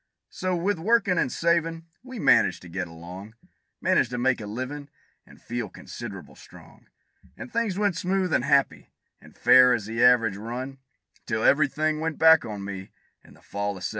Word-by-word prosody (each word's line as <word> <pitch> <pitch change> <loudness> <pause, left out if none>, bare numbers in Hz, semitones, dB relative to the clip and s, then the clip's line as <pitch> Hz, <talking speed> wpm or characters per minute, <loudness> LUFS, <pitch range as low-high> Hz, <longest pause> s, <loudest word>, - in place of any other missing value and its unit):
So, 185 -1 -2
with 175 +1 -1
workin' 200 -2 +2
and 130 - 0
savin', 165 -1 0 0.2
we 255 0 -10
managed 205 - +3
to 90 - -11
get 90 +1 -4
along; 90 +6 -11 0.4
Managed 120 - +2
to 125 - -4
make 125 -1 +1
a 105 - -7
livin', 130 +6 -6 0.4
and - - -17
feel 120 -3 -5
consid'able - - -10
strong; - - -17 0.5
And 125 - -10
things 225 -5 -1
went 205 -3 +1
smooth 185 0 -1
and - - +2
happy, 140 - +1 0.3
an' - - -17
fair 125 -1 +6
as 110 -4 -5
the 115 +2 -1
average 115 -5 +4
run, 125 +5 -6 0.5
Till 110 0 -1
every 145 0 +4
thing 155 +2 -1
went 160 -1 -3
back 160 -2 +6
on 105 -3 -6
me, 95 -1 -7 0.3
in - - -18
the - - -23
fall 100 0 -4
of - - -10
'71. - - -2
130 Hz, 185 wpm, -25 LUFS, 110-165 Hz, 0.5 s, fair